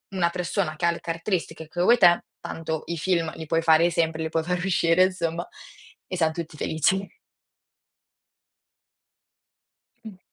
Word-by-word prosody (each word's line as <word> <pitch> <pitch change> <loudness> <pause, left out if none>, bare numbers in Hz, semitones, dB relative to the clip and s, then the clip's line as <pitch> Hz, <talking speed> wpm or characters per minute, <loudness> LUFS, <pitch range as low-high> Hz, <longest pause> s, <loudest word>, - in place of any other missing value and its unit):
una 175 -2 +2
persona 170 -3 -2
che 170 - -2
ha 170 - +4
le 170 - -6
caratteristiche 165 -1 -3
che 175 +3 -4
vuoi 235 +6 +5
te, 175 -3 +5 0.2
tanto 160 -1 -5
i 170 0 -3
film 165 -2 0
li 160 - -7
puoi 165 +1 +1
fare 165 +1 +5
sempre, 160 -1 0
li 160 - -2
puoi 160 0 -1
far 180 +1 -1
uscire, 175 -1 +3
insomma, 175 -2 -3 0.6
e 185 - -4
siam 160 -2 +2
tutti 160 -2 -7
felici. 190 +5 0 2.9
Mh. 205 -4 -10
170 Hz, 150 wpm, -25 LUFS, 160-180 Hz, 2.9 s, vuoi